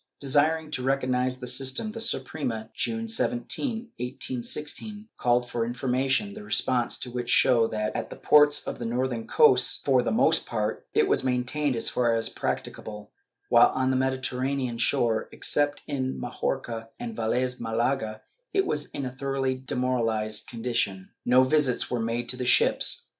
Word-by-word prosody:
Desiring 150 +3 +1
to 130 - -3
reorganize 130 -1 0
the 125 - -6
system, 130 - +1
the 225 +1 -6
Suprema, 125 - -2
June 225 0 -2
17, 240 +1 -1
1816, 145 - -4
called 125 0 +1
for 120 -1 -2
information, 125 -2 0
the 105 - -9
responses 120 +3 +1
to 125 - -6
which 120 0 -4
show 120 -3 +4
that, 105 -1 -3
at - - -3
the - - -8
ports 145 0 +5
of - - -5
the 120 - -4
northern 120 0 -2
coasts, 460 - +4
for - - +4
the - - -1
most - - +2
part, - - -3
it 440 -3 +4
was - - +3
maintained 130 +2 0
as 115 - +1
far 120 -2 +1
as 115 0 0
practicable, 105 -1 -5 0.4
while - - +6
on 130 0 +1
the - - +1
Mediterranean 130 -1 -1
shore, 115 -1 +1
except 145 0 0
in 130 -2 -3
Majorca 120 -2 -4
and 235 -2 -5
Velez 125 - -1
Mdlaga, 115 -1 -1 0.3
it 390 -1 +2
was 150 -1 -1
in 140 - -5
a 125 - -4
thoroughly 135 0 -1
demoralized 120 -4 -1
condition. 115 -6 -2 0.2
No 125 +1 +6
visits 130 -2 +1
were 125 - 0
made 115 +1 -2
to 125 - 0
the 125 - -3
ships. - - +3
130 Hz, 160 wpm, -26 LUFS, 120-140 Hz, 0.4 s, while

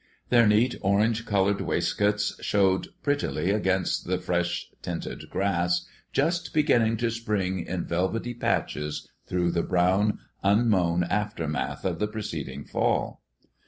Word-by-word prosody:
Their 120 -2 +6
neat 110 +4 +4
orange 105 +3 +2
colored 100 -1 +2
waistcoats 105 0 0
showed 95 -2 +2 0.2
prettily 145 -9 0
against 95 -5 0
the 90 +1 +1
fresh 90 -1 -1 0.2
tinted - - -5
grass, 90 -3 0 0.3
just 170 0 0
beginning 120 -7 +3
to 115 +1 0
spring 105 -5 -1
in 90 -1 -3
velvety 95 +8 -1
patches 75 -9 -2 0.2
through 90 -1 +1
the 85 0 +1
brown, 95 +4 +2 0.3
unmown 100 -5 +3
aftermath 85 -5 -2
of 85 -3 -1
the 105 - +1
preceding 80 -10 -5
fall. - - 0
95 Hz, 125 wpm, -27 LUFS, 90-110 Hz, 0.3 s, Their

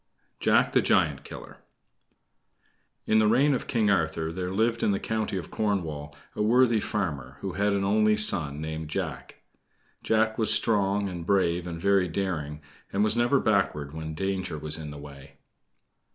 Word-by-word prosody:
JACK - - +3
THE - - +4
GIANT - - +2
KILLER - - -10 1.5
In 110 - +3
the 110 - +4
reign 135 +7 +4
of 130 - -3
King 110 -5 +2
Arthur 80 -3 0
there 90 +1 -3
lived 115 +4 0
in - - +2
the 100 - +1
County 110 -3 -2
of 90 - -7
Cornwall 80 -9 -2 0.2
a - - -2
worthy 120 +1 +4
farmer, 90 -11 -3
who - - -3
had 100 +1 +1
an 100 -1 0
only 105 +2 +3
son, 75 -9 +1
named 80 0 -5
Jack. - - -5 0.6
Jack 110 0 +1
was 110 -1 +2
strong 105 -2 +2
and 90 -3 -6
brave 90 -2 +1
and 85 -1 -5
very 100 0 +2
daring, 80 -5 -3 0.3
and 100 - +1
was 110 +1 +2
never 120 +4 +3
backward 95 - 0
when 80 0 -6
danger 95 -2 -2
was 75 0 -4
in 80 -2 -7
the 75 - -8
way. 70 -1 -12
95 Hz, 165 wpm, -27 LUFS, 80-110 Hz, 1.5 s, THE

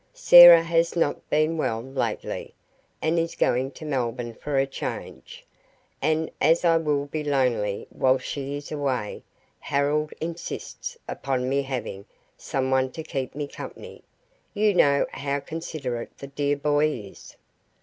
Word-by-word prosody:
Sarah 175 - +10
has 165 0 +1
not 165 -4 -1
been 155 +2 +1
well 115 -6 0
lately, 130 +3 -4 0.5
and 160 +2 +2
is 165 0 -2
going 130 +2 +1
to 155 - -10
Melbourne 120 -4 -2
for 145 +4 -3
a 135 - +3
change, 135 - -7 0.6
and 160 0 0
as 165 +2 +3
I 165 -1 +5
will 150 -3 0
be 150 +2 -4
lonely 125 -8 0
while 130 0 +2
she 140 +2 -5
is 145 - -10
away 135 -8 -2 0.4
Harold 145 +2 0
insists 170 - -6
upon 130 -2 -2
me 140 +2 +1
having 125 -7 -5 0.3
someone 130 -1 -1
to 160 - -6
keep 135 -5 -4
me 145 0 -3
company - - -10 0.5
you 210 0 +3
know 140 -5 +4
how 140 0 -2
considerate 140 -6 -6
the - - -8
dear 140 +1 -1
boy 145 +1 +2
is. 105 -10 -8
140 Hz, 140 wpm, -25 LUFS, 130-160 Hz, 0.6 s, Sarah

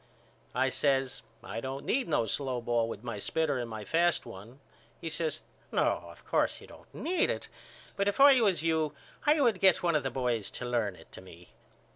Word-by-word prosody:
I 130 +1 +2
says 135 -1 +1 0.2
I 110 +4 -5
don't 135 +2 -5
need 265 0 +1
no 120 -8 +1
slow 130 +2 -1
ball 115 -1 0
with 110 -1 -7
my 115 -4 -4
spitter 145 +4 0
and 120 -1 -4
my 110 -2 -6
fast 170 +5 +2
one. 115 +8 -11 0.4
He 165 - -5
says 160 -1 -2 0.3
No - - +1
of - - -15
course - - +1
you - - -13
don't - - -16
need 360 +2 0
it - - -3 0.5
but 200 0 0
if 205 - 0
I 275 -2 +8
was 185 -8 +2
you 160 -2 +1 0.3
I 300 +1 +5
would 235 -8 +3
get 190 -1 +4
one 170 -1 +2
of 150 - +3
the 135 - -2
boys 120 -5 -1
to 125 - -5
learn 115 -5 0
it - - -17
to - - -10
me. 90 -1 -14
135 Hz, 205 wpm, -30 LUFS, 115-170 Hz, 0.5 s, I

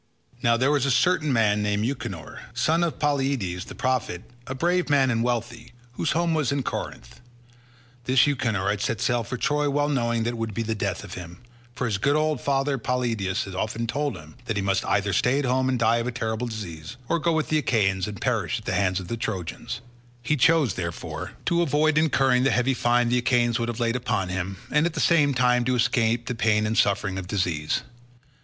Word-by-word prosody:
Now 115 0 +3
there 130 +4 +2
was 140 -2 +2
a - - +1
certain 155 +2 +2
man 105 -4 +2
named 105 +1 0
Euchenor, 120 - -5 0.2
son 165 +2 +2
of 170 - -1
Polyidus 135 -11 -1
the - - -10
prophet, 125 -8 -1 0.2
a 135 - -4
brave 175 +4 +1
man 135 -3 +4
and 115 -1 +1
wealthy, 120 -1 -3 0.2
whose 145 +5 -1
home 170 +1 +1
was 155 -5 +1
in 140 -1 -1
Corinth. - - -6 0.8
This 130 0 +5
Euchenor 115 -9 0
had 100 -1 -3
set 110 +1 -1
sail 120 -1 +1
for 125 +4 -5
Troy 150 +2 +1
well 145 +1 +1
knowing 120 -4 0
that 115 - 0
it 120 - -6
would 110 -3 -3
be 115 - -1
the 110 0 -1
death 105 - -3
of - - -9
him, 85 +5 -9 0.3
for 125 - -2
his 105 -5 -1
good 140 +6 +2
old 155 -3 +1
father 135 0 0
Polyidus 115 -6 -1
had 95 - -8
often 110 +4 -2
told 140 0 -2
him 80 +6 -14
that 110 - -2
he 100 - 0
must 100 -1 +1
either 100 -1 +1
stay 125 +8 +2
at 145 - 0
home 130 +1 +1
and 130 - +1
die 115 0 +3
of 115 +1 -2
a - - -1
terrible 115 0 -2
disease, 100 -3 -7
or 170 - +1
go 170 +1 +1
with 160 -1 0
the 155 - +3
Achaeans 95 -8 +1
and 105 -3 -7
perish - - 0
at - - -10
the - - -1
hands 95 -2 +1
of 95 - -8
the 115 - -3
Trojans; 95 -5 -4 0.4
he 150 - +1
chose, 155 -4 +3
therefore, 85 -2 -5
to 170 0 +2
avoid 155 -1 +2
incurring 135 -5 +3
the 135 - +3
heavy 125 +1 +2
fine 120 -1 +2
the 125 +1 +2
Achaeans 120 -1 +2
would 115 0 -1
have 120 0 -4
laid 115 0 +1
upon 110 -7 -1
him, 95 +1 -3
and 150 +3 +3
at 175 - -5
the - - -2
same 145 -5 +3
time 125 -1 +3
to 130 0 +1
escape 115 0 +1
the - - -2
pain 110 -2 +2
and 110 +1 -1
suffering 100 -2 +1
of 90 - -7
disease. 90 -6 -1
120 Hz, 220 wpm, -25 LUFS, 105-140 Hz, 0.8 s, This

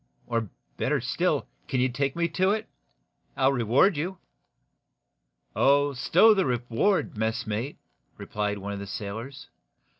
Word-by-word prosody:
Or, 115 -3 -2 0.3
better - - +1
still, - - 0 0.2
can 130 - -1
you 130 - +3
take 135 +2 -2
me 170 0 +1
to 185 +3 +1
it? 215 +2 -1 0.7
I'll 135 - +4
reward 135 - +3
you." 180 +5 -3 1.4
"Oh, 140 +1 +3
stow 185 - +5
the 195 -2 +2
reward, 125 - 0
messmate," 110 +3 -2 0.4
replied 105 -1 -3
one 100 +1 -5
of 100 - -5
the 100 - -7
sailors. 115 +8 -7
130 Hz, 130 wpm, -27 LUFS, 110-160 Hz, 1.4 s, stow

